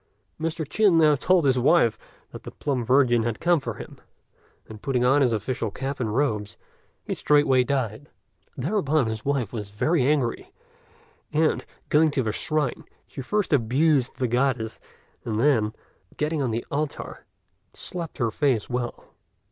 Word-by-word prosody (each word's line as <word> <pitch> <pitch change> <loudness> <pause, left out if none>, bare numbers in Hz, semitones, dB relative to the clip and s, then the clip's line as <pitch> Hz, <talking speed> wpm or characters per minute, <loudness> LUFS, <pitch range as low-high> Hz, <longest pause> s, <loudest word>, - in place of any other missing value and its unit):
Mr. 160 -1 -3
Chin 195 +2 +3
now 155 -2 +5
told 175 +3 +2
his 130 -2 +3
wife 125 -3 +4 0.4
that - - -9
the - - -8
Plum 135 -4 -2
Virgin 125 -1 +3
had 115 -1 -2
come 175 -1 +3
for 135 - -5
him; - - -10 0.7
and, 110 -1 -11
putting 125 -3 0
on 135 +3 +4
his 125 -3 +3
official 115 +1 -2
cap 135 +6 -5
and 110 -4 -2
robes, 105 -7 -1 0.5
he - - -3
straightway 145 -4 +3
died. 130 0 -2 0.5
Thereupon 155 - +1
his 110 -1 -4
wife 135 -7 -1
was 105 -3 -5
very 150 +10 +1
angry; 135 -3 0 0.8
and, 155 +1 +1 0.3
going 155 +1 +4
to 140 -3 -1
the 110 - -1
shrine, 150 +3 -2 0.2
she 135 - -8
first 195 +7 -1
abused 135 +2 +2
the 125 - 0
Goddess, 120 -2 0 0.4
and 110 -2 -2
then, 115 -5 +3 0.5
getting 150 0 -1
on 130 - 0
the 115 +1 -3
altar, 145 +1 -4 0.5
slapped 170 -3 -5
her 120 -5 0
face 130 -7 0
well. 120 -1 -4
135 Hz, 155 wpm, -25 LUFS, 120-150 Hz, 0.8 s, now